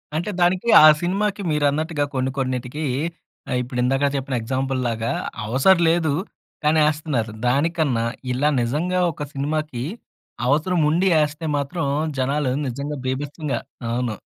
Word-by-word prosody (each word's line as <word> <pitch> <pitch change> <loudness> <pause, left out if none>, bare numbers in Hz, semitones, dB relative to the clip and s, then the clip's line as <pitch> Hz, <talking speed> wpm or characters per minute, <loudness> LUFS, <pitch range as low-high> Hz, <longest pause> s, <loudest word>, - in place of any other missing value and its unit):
అంటే 170 +6 -1
దానికి 180 +4 +2 0.2
ఆ - - +10 0.2
సినిమాకి 200 +3 -1
మీరన్నట్టుగా 150 +1 +1
కొన్ని 130 0 0
కొన్నిటికి 130 +3 -2 0.7
ఆహ్, - - 0
ఇప్పుడు 125 0 -4
ఇందాక 135 +2 +2
చెప్పిన 135 -1 -2
ఎగ్జాంపుల్‌లాగా 125 -2 -1 0.3
అవసరలేదు 165 - +3 0.5
కానీ 155 +1 +4
ఏస్తున్నారు. 150 -7 -1 0.2
దానికన్నా 140 -3 +1 0.3
ఇలా 145 +4 +2
నిజంగా 165 +10 0
ఒక 145 - -6
సినిమాకి, 145 -2 -2 0.6
అవసరం 160 +6 +2
ఉండి 180 +5 +2
ఏస్తే 150 +2 -2
మాత్రం, 145 +2 -2 0.3
జనాలు 135 +1 0 0.2
నిజంగా 140 +4 -4
బీభత్సంగా 140 +1 -2 0.3
అవును. 120 -1 -1
145 Hz, 120 wpm, -22 LUFS, 130-160 Hz, 0.7 s, ఆ